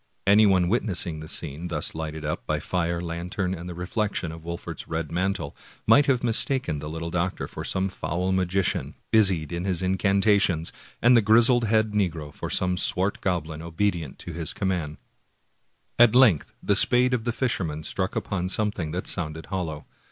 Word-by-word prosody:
Anyone 100 Hz, -3 st, +5 dB
witnessing 90 Hz, -6 st, 0 dB
the 80 Hz, -, -8 dB
scene 80 Hz, +1 st, -4 dB
thus 80 Hz, -3 st, -3 dB
lighted 80 Hz, -1 st, -5 dB
up 75 Hz, -, -4 dB
by -, -, 0 dB
fire, 85 Hz, -1 st, -2 dB
lantern, 90 Hz, +2 st, -3 dB
and 90 Hz, 0 st, -7 dB
the 90 Hz, -, -7 dB
reflection 90 Hz, -1 st, -2 dB
of 80 Hz, 0 st, -10 dB
Wolfert's 85 Hz, 0 st, -6 dB
red 80 Hz, -1 st, -3 dB
mantle, 95 Hz, +3 st, -2 dB, 0.3 s
might 145 Hz, -, +5 dB
have 130 Hz, -3 st, +2 dB
mistaken 120 Hz, -, +1 dB
the 75 Hz, -, -6 dB
little 80 Hz, +1 st, -5 dB
doctor 90 Hz, +2 st, -2 dB
for -, -, -7 dB
some 95 Hz, 0 st, -1 dB
foul 90 Hz, -1 st, -2 dB
magi 95 Hz, +1 st, +1 dB
cian, -, -, -2 dB, 0.2 s
busied 95 Hz, -9 st, +3 dB
in 85 Hz, 0 st, -3 dB
his 95 Hz, -2 st, 0 dB
incantations, 95 Hz, -2 st, +2 dB, 0.3 s
and 120 Hz, +1 st, +7 dB
the 115 Hz, -, +6 dB
grizzly 115 Hz, +2 st, +5 dB
headed 110 Hz, 0 st, +2 dB
negro 80 Hz, -8 st, -1 dB
for -, -, -6 dB
some 90 Hz, -1 st, 0 dB
swart 95 Hz, +3 st, 0 dB
goblin 80 Hz, -5 st, -2 dB
obedient 85 Hz, -2 st, -2 dB
to 85 Hz, -, -8 dB
his 80 Hz, -2 st, -3 dB
commands. 90 Hz, -6 st, -2 dB, 1.0 s
At 120 Hz, -1 st, +7 dB
length 115 Hz, -, +5 dB
the -, -, +2 dB
spade 125 Hz, +1 st, +5 dB
of 120 Hz, -3 st, 0 dB
the 120 Hz, -, 0 dB
fisherman 90 Hz, -, -2 dB
struck 95 Hz, +3 st, -3 dB
upon 90 Hz, -2 st, -2 dB
some 105 Hz, +2 st, 0 dB
thing 85 Hz, -6 st, -4 dB
that 90 Hz, -, -3 dB
sounded 80 Hz, -3 st, -3 dB
hollow. 80 Hz, -6 st, -3 dB
90 Hz, 175 wpm, -25 LUFS, 80-105 Hz, 1.0 s, and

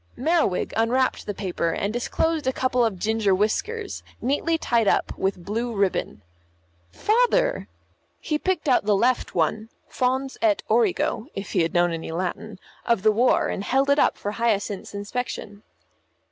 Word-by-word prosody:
Merriwig 310 Hz, -, +1 dB
unwrapped 250 Hz, +3 st, +1 dB
the 205 Hz, -, -2 dB
paper, 180 Hz, -4 st, -2 dB
and 200 Hz, +5 st, -2 dB
disclosed 310 Hz, +5 st, -1 dB
a -, -, +3 dB
couple 255 Hz, -1 st, +1 dB
of 220 Hz, -5 st, 0 dB
ginger 215 Hz, 0 st, +1 dB
whiskers, 400 Hz, -, -2 dB, 0.2 s
neatly 290 Hz, +6 st, 0 dB
tied 235 Hz, -8 st, +1 dB
up -, -, +1 dB
with 190 Hz, -2 st, -2 dB
blue 230 Hz, +3 st, -2 dB
ribbon. 195 Hz, -, -1 dB, 0.7 s
"Father!" -, -, +1 dB, 0.5 s
He 305 Hz, -2 st, -2 dB
picked 365 Hz, -3 st, -1 dB
out 250 Hz, -6 st, +3 dB
the 210 Hz, -1 st, +3 dB
left 245 Hz, +5 st, +1 dB
one, 215 Hz, +7 st, 0 dB, 0.2 s
fons 260 Hz, +1 st, -1 dB
et 325 Hz, -3 st, +2 dB
origo 360 Hz, -, +1 dB
(if 195 Hz, -1 st, -5 dB
he -, -, +2 dB
had 165 Hz, +2 st, -1 dB
known 175 Hz, 0 st, +3 dB
any 165 Hz, 0 st, -5 dB
Latin) 185 Hz, +4 st, -4 dB, 0.3 s
of 230 Hz, -5 st, +1 dB
the 215 Hz, -, +5 dB
war, 240 Hz, +4 st, +3 dB
and 195 Hz, -, -3 dB
held 270 Hz, +5 st, +2 dB
it 285 Hz, -, +3 dB
up -, -, +3 dB
for 205 Hz, -, -4 dB
Hyacinth's 210 Hz, -3 st, -1 dB
inspection. 205 Hz, -1 st, -5 dB
230 Hz, 160 wpm, -24 LUFS, 200-270 Hz, 0.7 s, the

